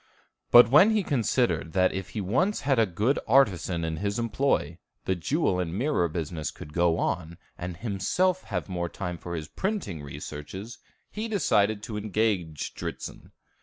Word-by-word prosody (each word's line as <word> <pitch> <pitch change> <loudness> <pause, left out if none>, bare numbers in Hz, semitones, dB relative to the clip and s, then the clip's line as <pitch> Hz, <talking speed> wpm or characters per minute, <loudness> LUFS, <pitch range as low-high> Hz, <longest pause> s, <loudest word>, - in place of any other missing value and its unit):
But 120 -1 +8
when 155 +10 +8
he 215 -2 +2
considered 120 - 0
that 95 -1 +3
if 95 -1 -5
he - - 0
once 155 - +1
had 135 -4 +2
a 110 - +4
good 105 +10 +1
artisan 95 - +3
in 80 -1 -3
his 100 +5 -2
employ, 115 - 0 0.3
the 95 - +1
jewel 95 - 0
and 85 -1 -2
mirror 125 - +1
business 80 -1 -3
could 75 - -11
go 85 -1 +2
on, 85 -1 -2 0.2
and 90 -1 -6
himself 120 - 0
have 90 -4 -3
more 85 -2 -3
time 90 -3 -5
for 85 -1 -5
his 80 -2 -5
printing 190 - -3
researches, 75 - -8 0.3
he 215 +2 -4
decided 110 - +2
to 110 -2 -5
engage 100 -7 -1
Dritzhn. - - -7
100 Hz, 165 wpm, -27 LUFS, 85-125 Hz, 0.3 s, But